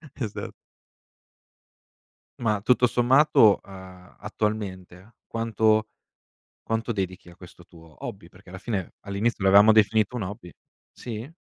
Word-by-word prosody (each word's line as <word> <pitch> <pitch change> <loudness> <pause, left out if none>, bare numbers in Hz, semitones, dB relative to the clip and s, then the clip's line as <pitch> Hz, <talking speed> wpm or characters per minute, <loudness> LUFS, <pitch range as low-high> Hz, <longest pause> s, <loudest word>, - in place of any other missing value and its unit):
Esa - - -5 1.9
Ma, 105 -4 0
tutto 125 +3 +3
sommato, 120 -3 +4
uhm, 95 -1 -14
attualmente, 100 -1 -5
quanto 110 -1 +1 0.8
quanto 115 +1 -2
dedichi 95 -4 -5
a 85 - -14
questo 90 0 -15
tuo 80 -3 -16
hobby? - - -9
Perché, - - -18
alla 95 - -9
fine 95 -3 -4
all'inizio 100 +2 -2
lo 95 - +3
avevamo 100 +3 +7
definito 110 +1 +2
un 120 - -3
hobby. 95 -2 -8 0.4
Sì? 115 +3 -8
105 Hz, 120 wpm, -25 LUFS, 95-115 Hz, 1.9 s, avevamo